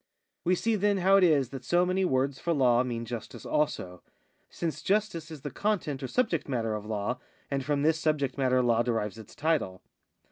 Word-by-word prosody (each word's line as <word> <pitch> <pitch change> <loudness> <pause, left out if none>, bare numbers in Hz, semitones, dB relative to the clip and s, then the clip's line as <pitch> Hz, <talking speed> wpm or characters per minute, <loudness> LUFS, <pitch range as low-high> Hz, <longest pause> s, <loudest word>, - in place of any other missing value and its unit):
We 180 +2 +3
see, 225 +5 0
then, 205 0 +2
how 190 +1 +5
it 195 - +4
is 145 -7 +4
that 135 -2 -8
so 175 +7 +3
many 185 +1 +1
words 135 -2 0
for 170 - 0
law 125 -5 +4
mean 120 -2 -3
justice 115 -1 -7
also; 90 - -1 0.5
since 165 -2 -4
justice 200 -5 0
is 155 -4 -9
the 145 - -5
content 175 -9 -1
or 130 - -3
subject 180 - 0
matter 115 -4 -1
of 105 0 -5
law, 110 +4 -2 0.3
and 135 -1 -1
from 145 0 0
this 160 +1 +3
subject 150 -4 0
matter 130 -2 +2
law 120 -1 +3
derives 115 -3 -2
its 110 - -12
title. 145 - -1
140 Hz, 200 wpm, -29 LUFS, 120-170 Hz, 0.5 s, how